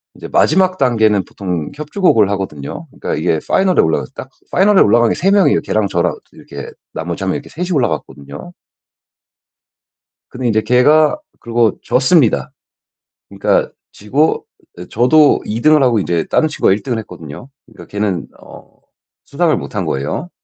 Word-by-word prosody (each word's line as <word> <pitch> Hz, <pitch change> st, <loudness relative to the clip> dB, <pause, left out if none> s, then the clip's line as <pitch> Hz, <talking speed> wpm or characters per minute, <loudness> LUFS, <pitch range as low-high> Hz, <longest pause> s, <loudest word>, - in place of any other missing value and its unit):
이제 -, -, -9 dB
마지막 185 Hz, +2 st, +2 dB
단계는 110 Hz, -6 st, +2 dB
보통 90 Hz, -6 st, -5 dB
협주곡을 150 Hz, -, +1 dB
하거든요. 75 Hz, -8 st, -5 dB
그러니까 -, -, -5 dB
이게 80 Hz, -1 st, 0 dB
파이널에 190 Hz, -1 st, +3 dB
올라가서 75 Hz, -5 st, -1 dB
딱 -, -, -8 dB, 0.2 s
파이널에 195 Hz, +1 st, +4 dB
올라간 115 Hz, +2 st, +4 dB
게 -, -, 0 dB
3 195 Hz, +2 st, +1 dB
명이에요. 200 Hz, -2 st, +3 dB
걔랑 110 Hz, -2 st, -1 dB
저랑 85 Hz, -3 st, -1 dB, 0.2 s
이렇게 -, -, -10 dB, 0.2 s
나머지 85 Hz, +3 st, -5 dB
1 95 Hz, -, -1 dB
명 -, -, -2 dB
이렇게 -, -, -7 dB
셋이 180 Hz, +3 st, -5 dB
올라갔거든요. 75 Hz, -, -4 dB, 1.8 s
근데 125 Hz, -1 st, -3 dB
이제 110 Hz, -1 st, +2 dB
걔가 150 Hz, -, +3 dB, 0.2 s
그러고 115 Hz, -1 st, 0 dB
졌습니다. 130 Hz, 0 st, +2 dB, 0.8 s
그러니까 -, -, 0 dB, 0.2 s
지고 135 Hz, +10 st, 0 dB, 0.4 s
저도 145 Hz, +5 st, +4 dB
2 110 Hz, +2 st, -4 dB
등을 155 Hz, -1 st, +4 dB
하고 120 Hz, -4 st, +2 dB
인제 85 Hz, -3 st, -1 dB
다른 155 Hz, -, +1 dB
친구가 150 Hz, -9 st, +1 dB
1 105 Hz, -, -4 dB
등을 125 Hz, -4 st, -2 dB
했거든요. 85 Hz, -, -10 dB, 0.2 s
그러니까 110 Hz, -, -14 dB
걔는 100 Hz, -4 st, -3 dB
어 -, -, -14 dB, 0.6 s
수상을 -, -, 0 dB
못 -, -, -8 dB
한 -, -, -1 dB
거예요. 70 Hz, -, -3 dB
115 Hz, 350 characters per minute, -16 LUFS, 95-150 Hz, 1.8 s, 파이널에